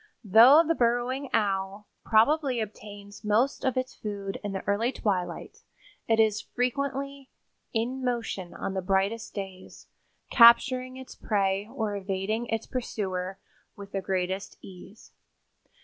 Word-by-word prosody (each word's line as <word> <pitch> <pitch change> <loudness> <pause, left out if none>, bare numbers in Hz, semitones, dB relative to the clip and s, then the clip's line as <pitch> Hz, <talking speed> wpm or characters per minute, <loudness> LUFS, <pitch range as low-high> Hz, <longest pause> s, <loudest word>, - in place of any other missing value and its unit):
Though 235 - +7
the 330 - +3
Burrowing 245 +1 0
Owl 195 0 -1 0.2
probably 255 +3 +3
obtains 205 -1 -8
most 220 +6 +1
of 260 -1 0
its 255 0 -2
food 200 -2 -5
in 205 - -3
the 190 -1 -5
early 215 +5 +1
twilight, 190 -8 -3 0.5
it 225 -1 +2
is 215 -1 +3
frequently 275 +2 -3 0.4
"in 250 +3 -2
motion 230 -7 -3
on 195 - -4
the 190 - -2
brightest 195 +4 -1
days, 190 -2 -8 0.5
capturing 255 +2 +6
its 260 -1 -10
prey 200 0 -1
or 220 -5 -2
evading 200 +4 -2
its 225 -1 -2
pursuer 190 -7 -4 0.4
with 200 -1 -11
the 195 - -2
greatest 190 +1 -3
ease." 195 +3 -13
215 Hz, 130 wpm, -27 LUFS, 195-250 Hz, 0.5 s, Though